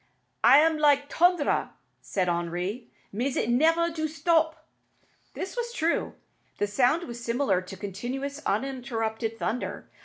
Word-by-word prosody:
"It - - +6 0.2
am 320 -1 +1
like 285 -1 +3
t'ondre," 350 -3 +2 0.3
said 185 -2 -1
Henri; 175 +6 -2 0.2
"mais 250 +6 -1
it 235 - +1
nevair 330 +6 +3
do 315 -1 -1
stop." 320 0 +1 0.7
This 380 - -5
was 475 -1 -3
true. 330 -5 0 0.4
The - - +1
sound 250 +10 +2
was 235 -1 -7
similar 235 -6 +1
to 185 +1 -10
continuous, 255 +9 -5
uninterrupted 225 -2 -2
thunder. 235 +2 -3
255 Hz, 130 wpm, -27 LUFS, 220-315 Hz, 0.7 s, It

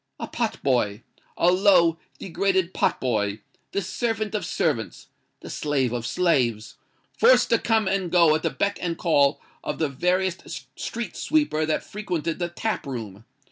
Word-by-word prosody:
A - - -3
pot 230 -2 -2
boy—a 125 +7 0
low, 180 -4 +4 0.2
degraded 190 0 0
pot - - +1
boy: 105 -4 -1 0.3
the 200 - -1
servant 220 +2 -2
of 210 - -2
servants—the 135 -9 -4
slave 135 -5 0
of 120 -1 -3
slaves—forced 145 - +1
to - - +4
come 220 -3 +1
and 190 -2 0
go 170 -3 +5
at 155 - 0
the - - 0
beck 200 0 -1
and 170 -2 -2
call 145 -5 +3 0.2
of - - -3
the 160 -3 0
veriest 180 +6 -1
street 235 -4 -5
sweeper 295 - +1
that 155 - 0
frequented 175 -6 -3
the 175 -1 -1
tap 215 0 -3
room! 110 -5 -6
170 Hz, 145 wpm, -24 LUFS, 135-195 Hz, 0.3 s, go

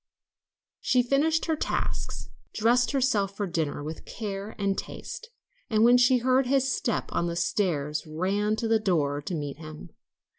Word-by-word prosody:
She 250 -1 +2
finished 300 +6 +2
her 320 - +1
tasks, - - -3 0.3
dressed 240 +3 +3
herself 215 -8 +1
for 205 - -1
dinner 160 -5 -2
with 155 +2 -6
care 205 -1 -6
and 200 -1 0
taste, 465 - -7 0.4
and 215 -2 +3
when 245 +1 +6
she 250 +1 +5
heard 255 +1 +2
his 270 0 +2
step 235 - -2
on 170 - 0
the 170 - -3
stairs 155 -4 -1
ran 195 +7 0
to 225 +1 -2
the 225 0 +3
door 150 -8 0
to 170 +4 -4
meet 145 -3 -4
him. 155 -1 -10
210 Hz, 160 wpm, -27 LUFS, 165-245 Hz, 0.4 s, when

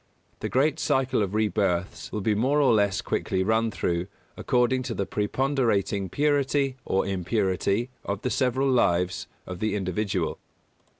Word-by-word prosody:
The - - -3
great 150 +4 +2
circle 130 -5 +1
of 100 0 -1
rebirths 100 -4 0
will 105 - -3
be 105 +2 +2
more 130 +8 +2
or 135 -5 +4
less 100 -3 +2
quickly 95 0 -1
run 110 +3 +2
through 85 -2 -1 0.3
according 125 +1 +1
to 115 - -3
the 100 - -1
preponderating 105 -4 0
purity 140 - +1
or 95 - +1
impurity 100 +4 0
of 100 0 -4
the 125 - -1
several 130 +1 +1
lives 90 -7 +1 0.2
of 90 -1 -7
the 110 0 0
individual. 100 +1 -2
105 Hz, 145 wpm, -26 LUFS, 95-130 Hz, 0.3 s, or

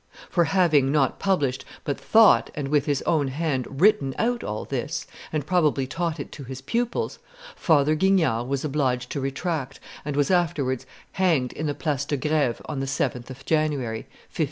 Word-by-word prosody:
For 175 -2 +3
having, 160 -6 +3
not 140 -3 +1
published, 145 -10 0 0.2
but 140 - -2
thought 225 -1 +5
and 145 -3 -3
with 145 0 +2
his 145 -2 0
own 150 -4 +1
hand 135 -2 -1
written 190 -9 +4
out 240 +1 0
all 105 - -4
this, - - -3 0.3
and 150 -3 -2
probably 150 -6 +2
taught 165 +3 -3
it 140 - -6
to 140 - -9
his 130 0 -7
pupils, 235 - -2 0.4
Father 150 -2 +3
Guignard 155 -9 +2
was 140 +2 -2
obliged 130 -4 -1
to 140 - -2
retract, 135 0 -3 0.2
and 145 -1 -3
was 145 +4 +2
afterwards 140 -8 0 0.2
hanged 160 -10 +1
in 155 - -3
the 145 - -1
Place 145 -4 -1
de 145 - -1
Greve 145 -3 0
on 145 -3 -4
the 135 - -2
7th 130 -2 -2
of 135 +1 -10
January, 145 -8 0 0.3
1595. - - -13
145 Hz, 180 wpm, -25 LUFS, 135-165 Hz, 0.4 s, thought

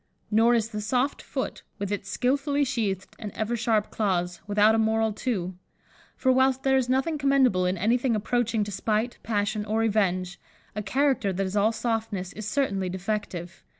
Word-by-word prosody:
Nor 230 +3 +5
is 225 -1 0
the 210 -2 -4
soft 250 +6 0
foot, - - -4 0.2
with 200 -1 -4
its 200 -1 -3
skilfully 280 +6 +1
sheathed 215 -8 -2
and 210 -2 -5
ever 220 +2 -1
sharp 220 -2 +1
claws, 180 -4 -1
without 210 +1 +4
a 225 - +2
moral 220 0 +2
too; 195 -6 -2 0.6
for 260 - +2
whilst 260 0 +3
there 270 0 +3
is 255 -2 +1
nothing 270 +4 +1
commendable 265 -10 +3
in 185 +1 0
anything 235 +5 +2
approaching 225 +1 0
to 205 - -5
spite, 215 +4 -1
passion, 210 -1 -1
or 215 +2 0
revenge, 185 -5 0 0.4
a 210 - -2
character 255 -1 +1
that 195 +1 -1
is 190 +2 -4
all 210 +2 +3
softness 225 -5 -2
is 215 -1 -6
certainly 200 -7 0
defective. 185 -2 -4
220 Hz, 175 wpm, -26 LUFS, 200-245 Hz, 0.6 s, Nor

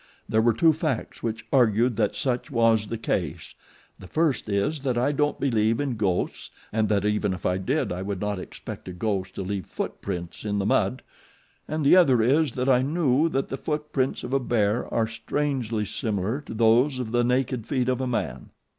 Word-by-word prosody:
There 110 - +2
were 115 0 +4
two 160 +7 +5
facts 155 -6 -3
which 115 -1 -3
argued 120 -2 +3
that - - +1
such 130 0 -1
was 115 -4 +3
the 115 - -3
case. 90 -8 -3 0.5
The 95 - -11
first 155 - 0
is 130 +10 0
that 130 -3 -1
I 125 +4 +2
don't 150 0 0
believe 115 -4 +1
in 140 -4 -1
ghosts 95 -5 -1 0.2
and 110 -1 +1
that 105 -2 +1
even 105 -2 +1
if 90 - -10
I 90 +1 +1
did 135 +11 -1
I 90 +1 -3
would 100 -1 -3
not 105 -1 -2
expect 90 - -9
a 90 - -5
ghost 95 0 -2
to - - -3
leave 95 0 -4
footprints 85 -3 -5
in 105 -1 -1
the 100 - 0
mud, 110 +4 +1 0.6
and 155 -1 -2
the 140 - +7
other 135 -9 +5
is 140 +2 +3
that 125 +1 -2
I 125 -2 +5
knew 150 +1 +2
that 135 -3 -1
the 135 - -3
footprints 150 -4 -2
of 125 - -5
a 135 - +3
bear 115 -3 0
are 115 - +2
strangely 115 -1 -2
similar 110 +4 -2
to - - -6
those 120 +5 +4
of 125 -3 -4
the 120 0 +2
naked 125 -2 0
feet 125 -2 0
of 130 0 0
man. 120 - -3
115 Hz, 200 wpm, -25 LUFS, 105-135 Hz, 0.6 s, the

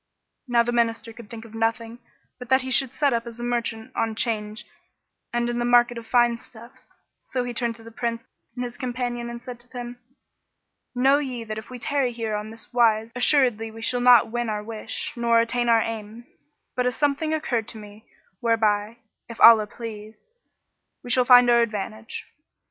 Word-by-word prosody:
Now 240 -1 +3
the 240 - -2
Minister 230 -1 0
could 230 -2 -13
think 230 0 -9
of 225 - -14
nothing 225 +1 -2 0.4
but 250 - -9
that 260 0 +4
he 260 - -5
should 260 0 +3
set 285 -3 +1
up 230 0 -2
as 235 0 -9
a - - -5
merchant 240 0 -3
on 225 -1 -1
'Change 215 -2 -2 0.7
and 240 0 0
in 240 0 -2
the - - 0
market 240 0 +4
of 225 - -13
fine 240 -1 +3
stuffs; 240 +3 -16 0.2
so 255 -1 -3
he 245 0 -5
turned 235 -2 -2
to 225 - -15
the 230 - -12
Prince 230 0 -3 0.3
and 250 - -3
his 240 -1 -6
companion 245 -1 -3
and 235 0 -8
said 250 -2 -8
to 240 - -14
them, 245 -1 -8 1.0
"Know 270 +3 +4
ye 255 -5 -4
that 215 -1 -5
if 220 - -13
we 255 - -7
tarry 260 +1 0
here 225 -2 -3
on 210 0 -4
this 225 +2 -9
wise, 225 -2 +3
assuredly 245 -4 +3
we 225 +1 -10
shall 245 +1 0
not 245 -3 +6
win 240 -1 -2
our 210 -1 -3
wish 220 0 -6
nor 235 -1 +3
attain 240 +1 0
our 230 -1 +5
aim; 225 +1 -6 0.5
but 250 0 +1
a - - +2
something 290 +4 0
occurred 250 -8 -1
to - - -9
me 210 +1 -13 0.3
whereby 220 -1 +1 0.3
(if 230 - -9
Allah 225 -2 +8
please!) 220 - -10 0.7
we 245 - -6
shall 250 +1 +3
find 245 -1 +8
our 240 0 +5
advantage." 215 0 -4
235 Hz, 195 wpm, -24 LUFS, 225-245 Hz, 1.0 s, Allah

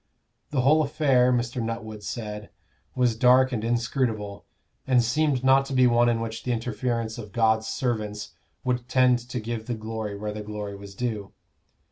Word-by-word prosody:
The 135 -3 +1
whole 150 +5 +5
affair, 135 -4 +3
Mr. 120 0 -1
Nuttwood 110 -2 -5
said, 105 -1 -6 0.5
was 125 -3 +2
dark 125 +2 +5
and 115 -3 -2
inscrutable, 115 -3 -1 0.4
and 125 -2 +4
seemed 135 +2 +1
not 135 +1 +5
to 135 - -5
be 130 -1 +5
one 120 0 +4
in 115 -1 +1
which 115 0 -4
the 125 - -2
interference 115 0 -2
of 105 -3 -8
God's 110 0 +2
servants 110 -4 -3 0.3
would 125 -1 -1
tend 125 -1 +4
to 125 +1 -5
give 110 0 -5
the 120 - -2
glory 110 -2 -5
where 105 +1 -4
the 105 - -5
glory 105 -1 -6
was 100 0 -11
due. 110 -4 -3
115 Hz, 170 wpm, -26 LUFS, 110-125 Hz, 0.5 s, whole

